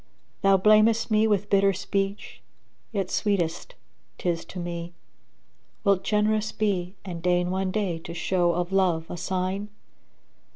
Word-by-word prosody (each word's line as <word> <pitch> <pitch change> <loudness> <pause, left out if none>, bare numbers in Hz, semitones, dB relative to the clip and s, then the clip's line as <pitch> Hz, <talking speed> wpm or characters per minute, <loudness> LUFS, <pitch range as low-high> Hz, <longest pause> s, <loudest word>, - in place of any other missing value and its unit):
Thou 195 -1 +5
blamest 215 +3 +4
me 215 +1 +4
with 205 -1 +1
bitter 195 0 +4
speech 195 +2 -3 0.5
yet 195 -4 -2
sweetest 195 - -1 0.4
'tis 170 -2 -2
to - - -10
me; 175 -1 -5 0.4
* - - -42
Wilt 200 -2 +2
generous 215 0 +1
be 190 -3 -1
and 175 -3 -6
deign 180 0 +1
one 190 0 -1
day 185 -4 -1
to 165 +1 -8
show 175 0 +1
of 175 +1 -2
love 180 -4 +2
a - - -4
sign? 190 +3 -2
190 Hz, 140 wpm, -26 LUFS, 175-205 Hz, 0.5 s, Thou